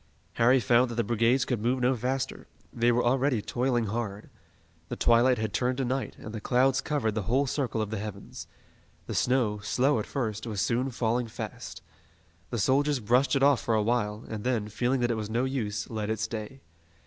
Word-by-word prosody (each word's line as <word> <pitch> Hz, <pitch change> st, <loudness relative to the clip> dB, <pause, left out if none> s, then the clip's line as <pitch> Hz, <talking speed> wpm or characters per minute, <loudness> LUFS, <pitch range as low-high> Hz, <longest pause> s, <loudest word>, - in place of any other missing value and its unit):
Harry 125 Hz, +3 st, +4 dB
found 120 Hz, +2 st, +3 dB
that 120 Hz, -, -5 dB
the 120 Hz, -, +1 dB
brigades 115 Hz, +4 st, +2 dB
could 120 Hz, -5 st, -2 dB
move 125 Hz, +3 st, +1 dB
no 125 Hz, +1 st, +2 dB
faster. 130 Hz, +3 st, -3 dB, 0.3 s
They 120 Hz, +1 st, +2 dB
were 120 Hz, +1 st, +2 dB
already 130 Hz, 0 st, +2 dB
toiling 120 Hz, +2 st, 0 dB
hard. 105 Hz, -1 st, -4 dB, 0.6 s
The -, -, -3 dB
twilight 120 Hz, +2 st, +4 dB
had 110 Hz, -2 st, -3 dB
turned 125 Hz, 0 st, 0 dB
to 135 Hz, -, 0 dB
night, 130 Hz, +2 st, -2 dB
and 110 Hz, -, -9 dB
the 110 Hz, -, -5 dB
clouds 130 Hz, +4 st, +2 dB
covered 135 Hz, -7 st, -1 dB
the 110 Hz, -, -1 dB
whole 135 Hz, +4 st, +3 dB
circle 125 Hz, -5 st, -1 dB
of 105 Hz, -, -6 dB
the 110 Hz, -, -2 dB
heavens. 100 Hz, -2 st, -8 dB, 0.6 s
The -, -, -5 dB
snow, 120 Hz, -5 st, +1 dB
slow 125 Hz, +5 st, +1 dB
at 105 Hz, -, -4 dB
first, 110 Hz, -5 st, -3 dB
was 105 Hz, -3 st, -3 dB
soon 125 Hz, +6 st, 0 dB
falling 120 Hz, -1 st, -1 dB
fast. 110 Hz, -, -7 dB, 0.7 s
The 120 Hz, -, -3 dB
soldiers 140 Hz, +6 st, +2 dB
brushed 125 Hz, +6 st, +2 dB
it 135 Hz, -, +2 dB
off 140 Hz, -2 st, +5 dB
for 115 Hz, -, 0 dB
a 110 Hz, -, +2 dB
while, 105 Hz, -1 st, -1 dB
and 105 Hz, -2 st, -5 dB
then, 115 Hz, -4 st, -1 dB
feeling 125 Hz, +4 st, 0 dB
that 120 Hz, 0 st, +1 dB
it 115 Hz, -, -1 dB
was 105 Hz, -1 st, -4 dB
no 120 Hz, +3 st, 0 dB
use, 110 Hz, -6 st, -3 dB
let 110 Hz, -2 st, -4 dB
it 110 Hz, -1 st, -1 dB
stay. 110 Hz, +4 st, -5 dB
120 Hz, 205 wpm, -28 LUFS, 110-130 Hz, 0.7 s, off